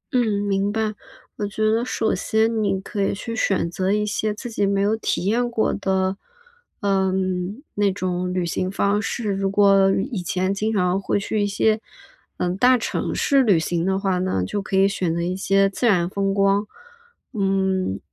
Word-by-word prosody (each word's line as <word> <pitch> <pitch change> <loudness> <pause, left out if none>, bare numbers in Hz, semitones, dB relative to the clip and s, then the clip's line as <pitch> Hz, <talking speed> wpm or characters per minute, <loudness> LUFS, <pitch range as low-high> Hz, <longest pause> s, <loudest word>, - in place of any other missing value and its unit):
嗯， 215 -5 +1
明 200 0 0
白。 220 0 -1 0.4
我 205 - -2
觉 215 +2 -2
得 225 +2 +1
首 230 -2 -1
先 220 0 +1
你 195 -2 0
可 200 +1 -5
以 195 - 0
去 230 +3 -5
选 195 -5 0
择 185 +2 -1
一 210 +1 +1
些 210 +1 -1
自 210 +4 -7
己 205 -2 0
没 200 0 +1
有 205 +2 +2
体 220 -4 -2
验 240 +4 +1
过 225 -2 0
的， 190 -1 0 0.6
嗯， 190 +2 -1
那 205 -1 +2
种 180 -1 -2
旅 180 -1 -1
行 185 +2 -2
方 200 +1 +1
式。 210 +1 -2
如 195 0 -1
果 195 -1 +4 0.2
以 210 -7 -2
前 185 +2 -1
经 215 +2 -1
常 185 -2 +1
会 200 - 0
去 210 +1 -2
一 205 - +1
些， 215 +2 +1 0.6
嗯， 180 0 -1
大 250 +4 +5
城 230 - -3
市 275 -2 +3
旅 210 -9 +4
行 165 +1 -1
的 190 0 +1
话 195 -2 0
呢， 180 - -1
就 205 - -3
可 195 -1 -2
以 195 +1 +5
选 185 -4 -1
择 170 - -1
一 180 +1 -2
些 195 +1 +2
自 200 +5 -1
然 180 -6 +3
风 195 +1 -1
光 200 +1 +2 0.7
嗯， 190 - 0
195 Hz, 205 characters per minute, -22 LUFS, 190-210 Hz, 0.7 s, 大